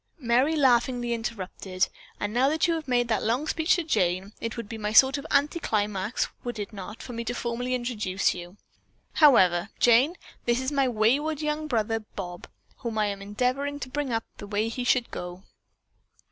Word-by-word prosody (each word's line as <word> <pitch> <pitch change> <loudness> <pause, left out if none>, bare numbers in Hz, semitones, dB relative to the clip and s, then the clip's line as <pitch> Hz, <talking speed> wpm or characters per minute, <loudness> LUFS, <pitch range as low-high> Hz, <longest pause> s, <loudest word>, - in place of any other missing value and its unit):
Merry 255 +3 +2
laughingly 245 -3 +2
interrupted: 190 -4 -2 0.3
"And 205 0 -2
now 255 +3 +3
that 315 +2 +2
you 335 - +2
have 320 -3 -4
made 245 -1 +2
that 220 - +1
long 245 +7 0
speech 320 +2 +2
to 350 - -1
Jane, 195 - 0
it 230 0 -4
would 230 -3 -5
be 215 -1 -4
sort 265 +4 +6
of 280 - -9
an - - +6
anti 300 +4 -7
climax, 210 - -1 0.2
would 240 -2 -4
it 205 +1 -5
not, 200 +2 -8
for 245 - -8
me 230 0 -4
to 245 - -2
formally 245 +2 -2
introduce 210 -6 0
you? 175 +2 -9 0.6
However, 190 - +5
Jane, 245 +8 +5 0.3
this 240 0 +2
is 260 +2 -2
my 275 -2 +2
wayward 260 +7 +1
young 300 +1 -1
brother 225 -4 0
Bob, 180 -5 -8 0.3
whom 230 -4 -4
I 215 - +3
am 200 -1 -3
endeavoring 255 +8 -1
to 255 - -5
bring 285 -1 -2
up 225 -1 0
the 205 - -8
way 210 +2 0
that 230 - -7
he 250 - -1
should 245 -1 +2
go." 180 +1 -7
235 Hz, 195 wpm, -27 LUFS, 210-265 Hz, 0.6 s, sort